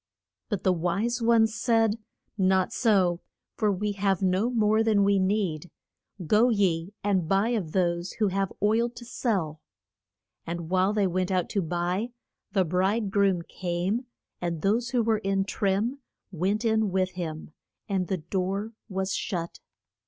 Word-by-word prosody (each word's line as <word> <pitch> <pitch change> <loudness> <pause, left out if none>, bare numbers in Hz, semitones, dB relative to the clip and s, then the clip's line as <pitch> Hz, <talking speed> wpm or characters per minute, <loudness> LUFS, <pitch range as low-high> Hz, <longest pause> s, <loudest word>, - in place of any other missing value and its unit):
But 205 -4 -2
the 185 - +4
wise 200 +8 -1
ones 225 -1 +4
said, 225 -2 +2 0.4
Not 190 -2 +2
so; 190 -7 +2 0.3
for 215 -2 +2
we 205 +2 -1
have 195 -2 0
no 190 +5 +2
more 220 -2 +3
than 215 -3 +3
we 200 0 +3
need. 185 -4 0 0.6
Go 220 +8 +4
ye 195 -3 +1
and 190 -5 +1
buy 195 +4 +3
of 205 -10 -1
those 175 -1 0
who 215 -3 +1
have 195 0 -1
oil 225 +3 +3
to 240 0 -11
sell. 185 - -2 0.8
And 170 0 -5
while 185 +1 +3
they 210 -2 +1
went 185 0 0
out 185 -2 0
to 200 - 0
buy, 180 +7 -2 0.4
the 190 -3 +2
bride 190 +5 0
groom 195 -3 +2
came, 185 +8 -2 0.3
and 170 -3 -3
those 225 +5 +1
who 245 -3 +1
were 220 -1 +2
in 195 -1 0
trim 205 +7 0 0.3
went 195 +6 -1
in 220 -2 +2
with 185 0 +1
him, 160 -4 -6 0.4
and 190 -3 -1
the 190 - -1
door 190 +6 -2 0.2
was 190 -1 -2
shut. 170 -3 -3
195 Hz, 155 wpm, -27 LUFS, 180-215 Hz, 0.8 s, the